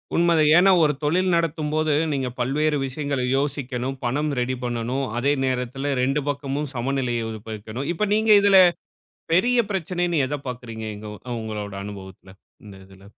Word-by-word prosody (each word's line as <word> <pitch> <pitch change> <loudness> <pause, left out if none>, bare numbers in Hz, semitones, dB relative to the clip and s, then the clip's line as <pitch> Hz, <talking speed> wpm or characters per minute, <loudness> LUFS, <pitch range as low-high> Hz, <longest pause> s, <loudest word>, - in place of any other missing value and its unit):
உண்மதான். 165 -3 +4
ஏன்னா, 190 +2 +6
ஒரு 150 -1 +3
தொழில் 180 +5 +2
நடத்தும்போது 155 -2 0 0.2
நீங்க 135 -2 -1
பல்வேறு 150 +5 +1
விஷயங்கள 140 0 -3
யோசிக்கணும். 135 -2 -3
பணம் 145 +5 0
ரெடி 125 +1 -1
பண்ணணும். 120 +3 -2
அதே 140 +3 +2
நேரத்தில 130 +2 -2
2 135 +3 +1
பக்கமும் 140 +1 -3
சமநிலையை 125 -1 -1
உருவாக்கணும். 110 +4 -6
இப்ப 210 +5 -1
நீங்க 220 0 +3
இதல 200 -1 +6 0.8
பெரிய 245 +8 +3
பிரச்சனை, 175 -1 -1
நீங்க 140 -5 +2
எத 145 - -2
பார்க்கறீங்க 115 -3 -6
எங்க 105 +1 -9 0.3
உங்களோட 105 -2 -5
அனுபவத்தில 95 -2 -10 0.3
இந்த 100 -2 -11
இதுல? 95 0 -17
135 Hz, 140 wpm, -23 LUFS, 120-155 Hz, 0.8 s, ஏன்னா